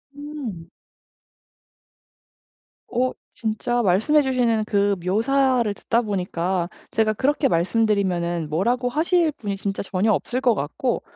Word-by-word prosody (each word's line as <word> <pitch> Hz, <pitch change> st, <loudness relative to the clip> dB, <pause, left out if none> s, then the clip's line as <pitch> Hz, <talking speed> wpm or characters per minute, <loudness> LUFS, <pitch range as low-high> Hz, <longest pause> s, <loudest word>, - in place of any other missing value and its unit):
음. 270 Hz, -, -7 dB, 2.2 s
어 255 Hz, +1 st, +1 dB, 0.2 s
진짜 230 Hz, +2 st, -1 dB
말씀해 225 Hz, +10 st, +3 dB
주시는 245 Hz, -5 st, +1 dB
그 200 Hz, -1 st, +2 dB
묘사를 245 Hz, +3 st, +2 dB
듣다 230 Hz, +3 st, 0 dB
보니까 180 Hz, -4 st, -2 dB, 0.2 s
제가 220 Hz, -1 st, +2 dB
그렇게 275 Hz, +5 st, +1 dB
말씀드리면은 175 Hz, -4 st, +1 dB
뭐라고 240 Hz, +10 st, 0 dB
하실 325 Hz, +4 st, +2 dB
분이 205 Hz, -6 st, -4 dB
진짜 195 Hz, 0 st, -3 dB
전혀 200 Hz, +3 st, +1 dB
없을 245 Hz, +5 st, -1 dB
것 245 Hz, -4 st, +3 dB
같고 200 Hz, -, -2 dB
220 Hz, 245 characters per minute, -23 LUFS, 190-255 Hz, 2.2 s, 말씀해